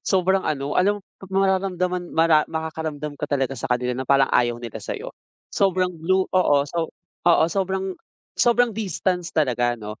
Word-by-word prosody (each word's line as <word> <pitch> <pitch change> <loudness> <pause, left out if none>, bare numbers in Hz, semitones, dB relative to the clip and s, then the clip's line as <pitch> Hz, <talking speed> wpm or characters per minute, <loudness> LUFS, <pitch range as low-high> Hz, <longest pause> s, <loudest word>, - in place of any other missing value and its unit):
sobrang 190 0 +2
ano 145 -3 -2
alam 205 +3 +3 0.3
mo 190 - 0
mararamdaman 180 -2 0
mara 160 -2 +4
makakaramdam 160 -2 -4
ka 150 - -3
talaga 135 -2 0
sa 130 - -5
kanila 125 0 0
na 130 +1 -5
parang 135 -1 +4
ayaw 120 -1 +3
nila 120 -2 -7
sa'yo. - - -6 0.4
Sobrang 185 -2 +1
blue 185 +3 +2
oo, 185 -6 +4
so 165 +3 -3 0.4
oo, 165 -1 +5
sobrang 190 +2 -1 0.4
sobrang 240 -1 +3
distance 185 -4 -2
talaga 120 -5 +1
'no, 105 -1 -8
165 Hz, 155 wpm, -23 LUFS, 135-190 Hz, 0.4 s, oo